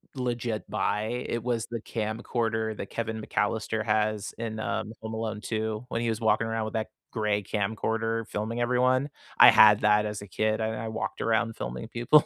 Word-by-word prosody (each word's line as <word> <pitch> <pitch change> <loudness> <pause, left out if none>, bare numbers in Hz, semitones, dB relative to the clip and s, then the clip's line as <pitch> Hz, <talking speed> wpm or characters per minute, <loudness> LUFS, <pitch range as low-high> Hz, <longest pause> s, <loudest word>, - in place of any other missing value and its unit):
legit 120 -4 -2
buy, 110 +3 -1
it 115 -1 -2
was 120 -2 -1
the 115 -2 -4
camcorder 110 0 -2
that - - -6
Kevin 110 -1 -3
McAllister 110 +1 -1
has 105 -1 0
in, 110 -1 -4
um, 110 0 -2
Home 110 0 -5
Alone 110 -1 -3
2, 110 +1 -2
when 115 - -1
he 120 - 0
was 110 -1 -1
walking 110 0 +2
around 115 -1 -1
with 110 - -5
that 110 0 -1 0.2
gray 105 -2 0
camcorder 110 +2 -1
filming 110 +3 -3
everyone, 125 +3 +2 0.3
I - - +11
had 105 -1 +7
that 105 0 +4
as 105 -1 -4
a 100 - -9
kid, 110 +3 0
and 110 0 -1
I 110 +1 -4
I - - -3
walked 110 - -4
around 115 0 +1
filming - - -5
people. 120 +6 +4
110 Hz, 190 wpm, -28 LUFS, 105-115 Hz, 0.3 s, I